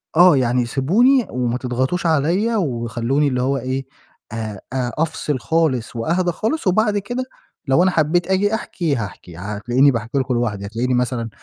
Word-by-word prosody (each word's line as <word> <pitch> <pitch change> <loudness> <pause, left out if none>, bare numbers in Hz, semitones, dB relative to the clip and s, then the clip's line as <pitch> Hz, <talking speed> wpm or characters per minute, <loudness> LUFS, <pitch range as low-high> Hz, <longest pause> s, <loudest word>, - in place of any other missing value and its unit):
آه، 175 -3 +7
يعني 125 -1 +1
سيبوني 215 - +3
وما 125 -1 -1
تضغطوش 130 +8 -2
عليّا، 175 +9 +2
وخلّوني 120 - 0
اللي 125 -2 0
هو 135 +2 +1
إيه 130 +1 -3 0.5
آآ 110 -3 -5
آآ 125 -2 -1
أفصِل 150 -3 -1
خالص 135 -7 0
وأهدي 175 +9 0
خالص، 220 - -2
وبعد 210 +2 +2
كده 245 +6 -3 0.4
لو 135 +7 +4
أنا 185 - +3
حبيت 165 +3 +1
آجي 200 +3 +1
أحكي 170 -9 -2
هاحكي، 95 -6 -7
هتلاقيني 115 +8 +2
باحكي 115 +3 -3
لكم 130 -1 0
لوحدي، 105 -4 -1
هتلاقيني 120 +5 -2
مثلًا 125 -2 -1
135 Hz, 160 wpm, -20 LUFS, 120-175 Hz, 0.5 s, آه